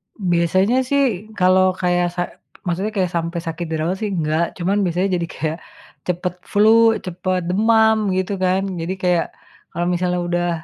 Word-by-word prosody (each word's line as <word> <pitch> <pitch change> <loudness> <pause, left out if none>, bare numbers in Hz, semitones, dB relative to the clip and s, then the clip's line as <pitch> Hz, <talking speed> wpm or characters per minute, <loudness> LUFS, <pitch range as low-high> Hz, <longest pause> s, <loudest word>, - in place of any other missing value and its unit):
Biasanya 185 +4 +2
sih 280 -1 +3 0.3
kalau 185 +1 +5
kayak 175 -1 +2
sa 175 - -1 0.5
maksudnya 190 +5 -1
kayak 185 -2 +1
sampai 170 +1 -2
sakit 165 +1 -3
dirawat 160 +3 -1
sih 215 - -1
enggak, 160 +1 +1
cuman 185 +3 0
biasanya 180 +2 0
jadi 170 - -3
kayak 155 +2 -2 0.5
cepet 180 0 -1 0.2
flu, 225 +2 +5
cepat 185 +1 -2
demam 220 +3 +4 0.2
gitu 190 +2 -1
kan, 185 +1 +2 0.2
jadi 170 +3 -2
kayak 180 -2 +2 0.5
kalau 175 - -2
misalnya 180 0 0
udah, 175 0 0
180 Hz, 150 wpm, -20 LUFS, 170-195 Hz, 0.5 s, kalau